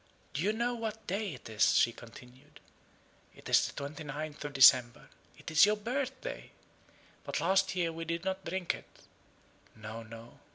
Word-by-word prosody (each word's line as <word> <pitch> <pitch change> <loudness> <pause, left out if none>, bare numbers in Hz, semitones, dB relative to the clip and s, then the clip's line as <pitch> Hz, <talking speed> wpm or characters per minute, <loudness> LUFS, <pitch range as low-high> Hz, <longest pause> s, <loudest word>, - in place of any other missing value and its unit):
"Do 145 - -2
you 200 +5 +2
know 235 +3 -1
what 220 -2 -5
day 195 -3 -3
it - - -12
is?" 110 -1 +3
she 120 - +4
continued. 125 +6 -15 0.8
"It - - -13
is - - +4
the - - -9
29th 150 +1 -6
of 145 - -5
December 125 -3 +5 0.3
it - - -8
is 155 +5 +7
your 210 - +3
birthday! 260 +4 -4 0.7
But - - -3
last 190 0 +2
year 170 -2 0
we 165 0 -6
did 170 +2 -3
not 190 0 -2
drink 180 0 -2
it - - -11 0.9
no, 110 +1 -8
no. 115 +1 -12
160 Hz, 165 wpm, -31 LUFS, 130-200 Hz, 0.9 s, is